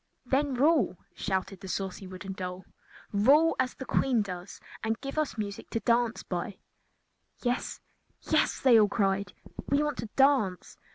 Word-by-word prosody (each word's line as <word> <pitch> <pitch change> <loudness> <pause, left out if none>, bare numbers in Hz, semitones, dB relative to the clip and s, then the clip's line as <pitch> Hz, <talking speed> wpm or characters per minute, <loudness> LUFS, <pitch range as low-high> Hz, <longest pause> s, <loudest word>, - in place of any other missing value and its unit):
"Then 270 +2 +1
rule!" 275 - +3 0.2
shouted 190 0 -2
the 190 - -9
saucy 190 0 -4
wooden 185 +1 -7
doll. 185 0 -6 0.5
"Rule 280 +11 +5
as 260 -1 0
the 265 - -7
Queen 250 -5 +2
does, 180 -1 -7 0.2
and 225 0 -1
give 275 0 -6
us 310 -6 -1
music 205 -2 -5
to 225 - -1
dance 235 0 +1
by." 185 +3 -4 0.9
"Yes! 245 0 -2 0.4
yes!" - - +2
they 245 -4 +6
all 210 -1 +4
cried. 195 -2 0 0.3
"We 280 +2 +2
want 295 -3 -2
to 230 - -3
dance!" 265 -10 +2
220 Hz, 155 wpm, -29 LUFS, 195-265 Hz, 0.9 s, they